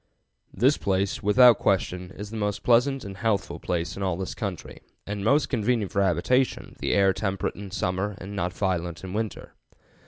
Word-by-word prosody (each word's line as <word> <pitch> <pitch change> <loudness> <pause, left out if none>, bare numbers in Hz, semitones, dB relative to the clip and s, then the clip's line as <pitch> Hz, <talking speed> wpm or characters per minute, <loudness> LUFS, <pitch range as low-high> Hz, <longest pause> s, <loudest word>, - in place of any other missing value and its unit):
This 130 +8 +3
place, 95 0 -1
without 120 +2 +6
question, 90 -1 0
is 105 +1 -7
the - - -6
most 105 -2 -2
pleasant 125 +2 +3
and 95 -1 -8
healthful 100 -7 -1
place 85 -1 -2
in 100 - -7
all 95 -3 0
this 95 0 -4
country, 100 -7 -6 0.2
and 100 0 -4
most 140 +8 +3
convenient 115 -4 0
for 100 - +1
habitation, 125 - +1
the - - 0
air 95 -1 +4
temperate 95 -1 -2
in 100 0 -8
summer 95 +3 -2
and 100 +1 -8
not 90 -2 -1
violent 90 -3 -2
in 95 0 -6
winter. 110 -1 -4
100 Hz, 180 wpm, -26 LUFS, 95-110 Hz, 0.2 s, without